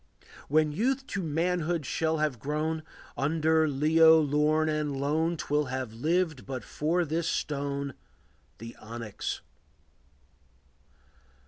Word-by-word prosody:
When 155 +1 +3
youth 260 - 0
to 200 - -1
manhood 170 0 0
shall 160 +4 0
have 150 -6 -1
grown, 155 +4 -2 0.3
Under 160 +2 +2
Leo 160 +3 +5
lorn 150 +1 +2
and 150 -3 -1
lone 160 +4 0
'Twill 150 0 0
have 130 -3 -4
lived 155 +2 0
but 130 -2 -4
for 170 +4 0
this 165 +2 -1
stone, 140 -1 -2 0.6
The 115 +1 -9
onyx. 115 -1 -5
155 Hz, 110 wpm, -28 LUFS, 140-160 Hz, 0.6 s, Leo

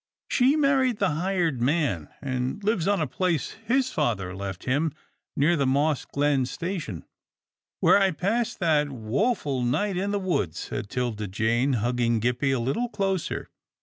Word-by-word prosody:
" - - -68
She 260 +3 +3
married 270 -5 +3
the 195 -4 +1
hired 165 -4 0
man, 125 - 0
and 130 +7 -2
lives 200 -5 +1
on 200 -1 +2
a - - +2
place 165 +2 -1 0.2
his 260 +1 +2
father 100 - -1
left 95 -2 -5
him 145 +4 0 0.4
near 160 +5 +3
the 140 -4 +1
Moss 140 +1 +1
Glen 140 -3 +1
station." 165 - -4 0.4
" - - -68
Where 200 - +6
I 195 -1 +4
passed 200 +7 -1
that 150 -4 +3
woful 135 - -1
night 180 +11 0
in 195 +2 -1
the 205 - 0
woods," 175 - -1
said 100 - -5
'Tilda 115 -4 -2
Jane, 115 +7 +1
hugging 120 0 +1
Gippie 125 +4 0
a 135 - +2
little 135 - -1
closer. 195 -5 -2
145 Hz, 165 wpm, -26 LUFS, 120-195 Hz, 0.4 s, Where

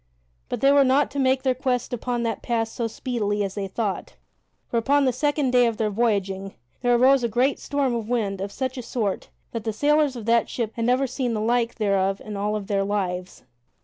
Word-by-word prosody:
But - - -3
they 275 - +5
were 280 0 +6
not 270 +2 +3
to 280 - -3
make 260 0 +2
their 260 -2 +2
quest 250 -1 -1
upon 245 0 -2
that 225 -3 -2
pass 225 -2 -1
so 235 - -2
speedily 215 -3 -2
as 195 -1 -3
they 200 -1 -3
thought, 200 0 -3 0.5
for, 235 - -1
upon 275 +5 +3
the 255 - +2
second 290 0 0
day 245 -1 +5
of 230 -2 -2
their 215 -1 0
voyaging, 195 -3 -1 0.3
there 245 -1 +3
arose 260 +2 +5
a - - +2
great 250 +5 +1
storm 280 -3 -1
of 230 -2 -3
wind 205 -6 -1
of 200 +1 -4
such 260 +3 -3
a - - -3
sort 225 -4 -3 0.2
that 230 -2 -4
the 220 - -1
sailors 290 +4 +2
of 230 -3 -7
that 235 0 +3
ship 230 -3 -2
had 230 - -2
never 250 +3 +3
seen 250 -2 -2
the - - -1
like 235 +1 +1
thereof 195 -2 +1
in 210 -1 -7
all 205 +1 -1
of 210 -2 -4
their 195 0 0
lives. 185 -3 -3
235 Hz, 225 wpm, -24 LUFS, 205-260 Hz, 0.5 s, were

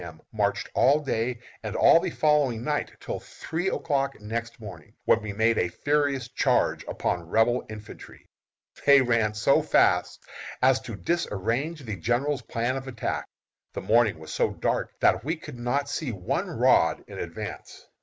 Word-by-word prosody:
M., 80 -2 -10
marched 105 -2 0
all 145 +4 +4
day 120 -3 -2 0.2
and 105 -2 -5
all 165 - +6
the 185 +1 -2
following 145 -8 +2
night, 150 0 -1
till - - -5
three 170 +4 -5
o'clock 140 - -1
next 115 +2 -5
morning, 95 -8 -11
when 110 - +4
we 105 -1 -5
made 110 +3 +2
a 90 - +1
furious 140 +4 0
charge 130 - +1
upon 85 -2 -3
Rebel 120 +4 +2
infantry. 105 -1 -11 0.6
They 140 -1 +8
ran 115 -3 +1
so 105 - +3
fast - - +2 0.4
as 130 0 +4
to 125 -4 -7
disarrange 135 - -2
the 110 -5 -5
general's 125 - 0
plan 120 +3 -2
of 135 0 -7
attack. 120 -4 -3 0.5
The - - -4
morning 115 -4 +3
was 80 0 -9
so - - +2
dark - - -1
that - - +3
we 160 +5 -1
could 150 -6 -10
not 135 +4 -1
see 140 -2 -3
one 95 -5 -2
rod - - +3
in - - -9
advance. - - -7
120 Hz, 165 wpm, -26 LUFS, 110-140 Hz, 0.6 s, They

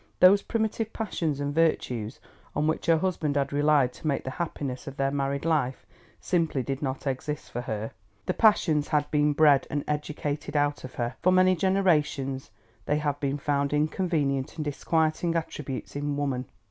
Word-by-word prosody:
Those 195 +2 +7
primitive 220 0 -1
passions 165 -9 -2
and 145 0 -2
virtues 125 -8 0 0.4
on 150 - +1
which 160 +1 -1
her 165 -1 +5
husband 160 -4 -1
had 140 -1 0
relied 145 -3 +3
to - - -7
make 140 - 0
the 130 - -4
happiness 140 -5 -4
of 140 - -7
their 135 0 +1
married 140 +1 -1
life 145 -6 0 0.3
simply 165 -7 0
did 135 +2 -3
not 135 -1 -3
exist 140 +2 -3
for 120 - -3
her. 110 -2 -4 0.3
The - - 0
passions 160 -9 +3
had 145 -1 0
been 150 0 +3
bred 145 -2 +5
and 145 -1 -2
educated 150 0 -3
out 145 0 +1
of 130 - -9
her; 120 +1 -3
for 185 - +4
many 185 0 +5
generations 155 -8 +1 0.4
they 150 - +2
have 145 -2 -1
been 140 -1 -1
found 140 0 0
inconvenient 150 -3 0
and 155 - -4
disquieting 160 +3 0
attributes 145 -6 -4
in 145 0 -2
woman. 135 -3 -1
145 Hz, 170 wpm, -27 LUFS, 135-160 Hz, 0.4 s, Those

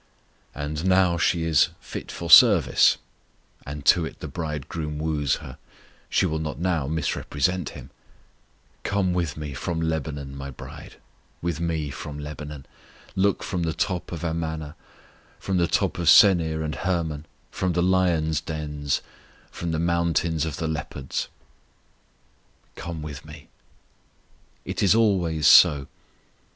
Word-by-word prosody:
And 75 +2 -4
now 90 -2 +3
she 85 0 +2
is 80 -3 +3
fit - - -8
for 85 - -6
service, 95 - +7 0.7
and 70 0 -7
to 90 - +5
it 80 - -7
the - - -6
Bridegroom 75 -1 -4
woos 75 -3 0
her; 65 - -10 0.5
she - - +2
will 80 0 -1
not 80 -1 -4
now 85 -5 0
misrepresent 80 +2 -1
Him: - - -12 0.9
Come 100 -3 0
with 85 -5 -2
Me 75 -2 -5
from 80 +5 -3
Lebanon, 75 -4 -3
My 70 0 -6
bride, 65 - -11 0.4
With 85 -2 -3
Me 80 -4 -2
from 75 0 -7
Lebanon; 75 -1 -7 0.5
Look 100 +1 +1
from 90 - -3
the 80 -1 -1
top 90 +2 -2
of 85 -2 -6
Amana, 80 -2 -3 0.6
From 95 -1 -2
the 85 -1 +2
top - - 0
of 85 - -2
Senir 80 -5 +6
and 75 - -3
Hermon, 80 -4 -2 0.2
From 90 -2 -1
the 85 +1 +1
lions' 85 -4 +2
dens, 75 -2 -3 0.5
From 85 -1 -4
the 80 - -1
mountains 85 -1 +1
of 80 -3 -4
the 80 - -2
leopards. 80 -4 -4 1.5
"Come 85 -3 -6
with 75 -2 -7
Me." 75 -1 -13 1.2
It - - -3
is 100 +1 +5
always 90 -9 +2
so. 70 0 +7
80 Hz, 140 wpm, -24 LUFS, 75-85 Hz, 1.5 s, service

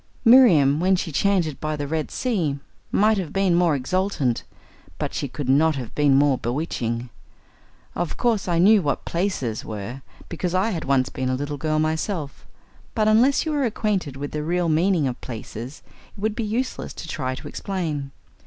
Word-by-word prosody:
Miriam, 175 - +6
when 185 +2 +3
she 175 -2 -3
chanted 170 -2 +1
by 155 0 -2
the 145 -1 -3
Red 155 +1 -2
Sea 180 - -1 0.3
might 215 0 +3
have 175 -5 -4
been 195 -2 +2
more 170 -3 +3
exultant, 140 -3 -1 0.5
but - - -3
she 140 - -2
could 140 +1 -6
not 150 +4 +4
have 125 -4 -6
been 145 -2 +3
more 140 -2 +3
bewitching. 120 -3 -3 0.8
Of 175 -2 -3
course 230 -6 +1
I 175 -2 +1
knew 200 +4 +6
what 145 -4 -2
"places" 170 - -2
were, 110 +5 -6 0.3
because 175 +1 -3
I 195 +5 +2
had 170 -5 -4
once 135 -2 +2
been 130 0 -3
a 130 - +1
little 145 +2 -4
girl 155 +2 -1
myself, 155 0 -2 0.5
but 215 -1 +2
unless 245 +8 +4
you 315 - -1
are 290 -2 +1
acquainted 210 - -1
with 145 +1 -5
the 150 - -3
real 170 +2 0
meaning 165 -1 +2
of 125 -1 -5
"places," 120 +3 -8 0.3
it - - -12
would 215 +1 0
be 230 - -2
useless 240 +5 -3
to - - -7
try 130 -5 -3
to - - -9
explain. 160 -8 -3
160 Hz, 180 wpm, -23 LUFS, 140-195 Hz, 0.8 s, Miriam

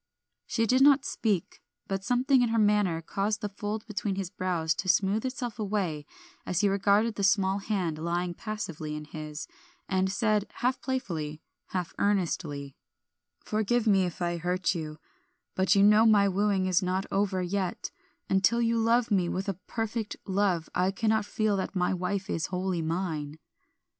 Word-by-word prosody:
She 225 - +1
did 255 +4 +3
not 280 0 +6
speak, 205 -7 -1 0.3
but 195 -1 -2
something 255 +3 +3
in 240 - +2
her 230 - +1
manner 205 -6 +2
caused 205 +5 -1
the 210 - -2
fold 210 +2 -4
between 210 -2 -2
his 190 -2 -4
brows 170 -4 0
to 185 - -2
smooth 205 +7 +2
itself 250 -4 -5
away 190 -8 -2 0.4
as 180 +1 -1
he 205 - +4
regarded 200 +3 +2
the 200 - -4
small 195 -1 +3
hand 185 -6 -2
lying 175 +2 -1
passively 170 -8 -5
in 150 0 -6
his, 155 0 -7 0.4
and 190 0 +1
said, 215 -1 +1
half 255 +2 0
playfully, 165 - -3 0.3
half 180 -3 -3
earnestly 160 -8 -1 0.7
"Forgive 220 +2 +1
me 195 -4 +4
if 175 0 -4
I 175 0 -1
hurt 180 +2 0
you, 155 -3 -5 0.6
but 190 +1 +3
you 200 - +5
know 210 +2 +6
my 205 -2 +5
wooing 195 0 +1
is 185 0 +2
not 185 +1 -1
over 195 -2 +1
yet; 185 0 -2 0.4
and 190 0 +1
till 235 +4 +4
you 230 0 +2
love 230 +1 +2
me 185 -4 +2
with 190 +2 -3
a 195 - 0
perfect 225 -1 -3
love 190 -4 +1
I 180 +1 +2
cannot 220 +2 +1
feel 215 -1 0
that 190 - -3
my 180 0 +1
wife 185 +2 -2
is 160 - -1
wholly 185 -1 -2
mine." 160 -3 -3
195 Hz, 170 wpm, -28 LUFS, 180-215 Hz, 0.7 s, not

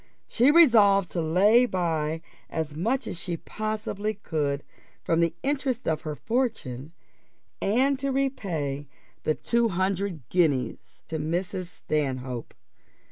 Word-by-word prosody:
She 245 +4 +4
resolved 215 - +6
to 170 - -1
lay 205 +10 +5
by 165 -4 -1 0.3
as 155 -2 -3
much 230 - 0
as 175 - -5
she 170 -1 -3
possibly 215 +1 -3
could, 145 -7 -2 0.4
from 165 - +1
the 170 -1 +2
interest 270 -3 -1
of 160 -1 +1
her 155 -3 -4
fortune, 185 - -2 0.7
and 260 +6 +2
to 275 0 -1
repay 170 - -2 0.3
the 155 - +1
two 235 -1 +1
hundred 185 - -1
guineas 145 -9 0
to 160 - -2
Mrs. 175 +4 -2
Stanhope. 130 -7 -3
180 Hz, 125 wpm, -26 LUFS, 155-225 Hz, 0.7 s, resolved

